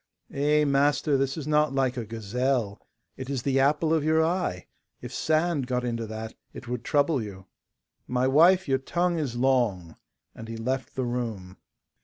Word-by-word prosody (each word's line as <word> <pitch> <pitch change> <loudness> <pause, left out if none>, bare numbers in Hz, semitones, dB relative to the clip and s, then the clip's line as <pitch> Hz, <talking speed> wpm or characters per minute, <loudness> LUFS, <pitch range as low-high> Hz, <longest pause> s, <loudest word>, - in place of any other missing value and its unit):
'Eh, 150 +2 +2
master, 145 +1 +2
this 135 +1 0
is 155 - -5
not 150 -2 +2
like 130 -2 +1
a 120 - -3
gazelle. 115 0 -2 0.4
It 130 0 -7
is 135 -4 -2
the 135 -1 +1
apple 150 +4 +2
of 160 -2 +2
your 160 +1 +3
eye. 165 - -2 0.3
If - - -8
sand 155 -3 0
got 125 -1 -1
into 115 -2 -3
that, 110 +1 -6 0.2
it 120 - -10
would 120 -1 -4
trouble 145 -1 +2
you.' 95 -3 -8 0.6
'My 125 +1 +1
wife, 170 +7 +5
your 135 -1 +2
tongue 175 +5 0
is 135 -6 -3
long,' 120 -10 +1 0.4
and 115 - -10
he 115 0 -6
left 130 +3 -3
the 130 - -1
room. 115 -7 -4
130 Hz, 175 wpm, -26 LUFS, 115-150 Hz, 0.6 s, wife